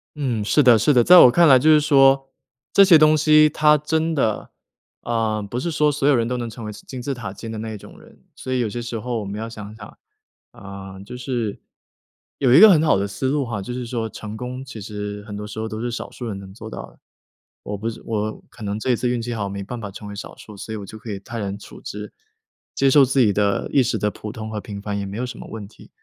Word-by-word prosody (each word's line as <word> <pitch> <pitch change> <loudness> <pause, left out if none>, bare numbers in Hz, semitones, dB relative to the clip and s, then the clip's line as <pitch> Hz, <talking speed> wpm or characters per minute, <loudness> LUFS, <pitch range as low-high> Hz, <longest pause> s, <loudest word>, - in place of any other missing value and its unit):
嗯， 125 -8 -2
是 150 - +3
的 125 -4 +6
是 115 +7 +3
的。 120 - +5
在 180 +6 +8
我 125 -8 +9
看 170 +4 +5
来 135 -3 +8
就 155 +5 +4
是 150 -1 +6
说， 135 -2 +4 0.4
这 200 - +7
些 170 -5 +7
东 155 0 +5
西 155 0 +5
它 150 +1 +4
真 160 +2 -1
的 110 -8 -1 0.5
嗯， 110 -3 -1
不 120 +4 -4
是 170 +6 -2
说 150 -1 +2
所 140 -1 -1
有 145 - +5
人 115 -2 +1
都 125 +1 -2
能 120 - -4
成 115 0 -9
为 105 - -5
金 125 +5 -9
字 135 +2 -3
塔 105 -6 -7
尖 115 +2 -8
的 110 - -6
那 110 +1 -5
一 - - -6
种 - - -14
人， - - -19
所 130 - -5
以 130 - 0
有 115 -3 0
些 120 - -5
时 120 -1 -5
候 120 0 -3
我 - - -6
们 100 +2 -5
要 115 +1 -5
想 105 -1 -9
想 105 -2 -12 0.5
啊， 95 -1 -10
就 105 +6 -9
是 120 -4 -3 0.8
有 125 -3 +3
一 140 - +8
个 220 +2 +10
很 165 -6 +5
好 155 - +4
的 100 +1 -1
思 130 +7 -3
路 145 0 0
哈， 115 -4 -4
就 100 +5 -6
是 125 -1 -5
说 115 -2 -3
成 110 0 -8
功 125 +2 -6
其 130 -4 -9
实 105 0 -6
很 105 -2 -8
多 105 0 -6
时 105 - -10
候 110 - -3
都 110 0 -6
是 120 - -2
少 120 - -6
数 120 - -7
人 100 -3 -4
能 95 -1 -11
做 110 +1 -9
到 - - -7
的。 - - -26 0.6
我 105 - -5
不 110 +3 -3
是 115 - -8
我 110 -1 -3
可 - - -17
能 100 0 -3
这 130 - 0
一 - - +3
次 125 +2 -1
运 120 -1 -1
气 120 +1 -4
好， 100 -3 -3
没 100 0 -5
办 115 +4 -7
法 105 - -6
成 100 +2 -10
为 100 - -8
少 - - -8
数， 105 - -12
所 110 - -8
以 - - -3
我 100 - -7
就 110 +2 -11
可 115 -4 -8
以 100 - -4
泰 115 +4 -7
然 100 -1 -4
处 105 - -13
之， 105 0 -8 0.6
接 135 - +2
受 140 +1 +6
自 135 +1 0
己 110 -5 +4
的 100 0 0
一 135 - +5
时 120 -2 0
的 105 0 -1
普 105 - -8
通 110 0 -7
和 105 -1 -4
平 100 -1 -8
凡 100 0 -3
也 100 - -4
没 100 +2 -6
有 125 - -2
什 125 -1 -8
么 - - -9
问 110 -3 -7
题。 105 - -18
115 Hz, 300 characters per minute, -22 LUFS, 105-130 Hz, 0.8 s, 个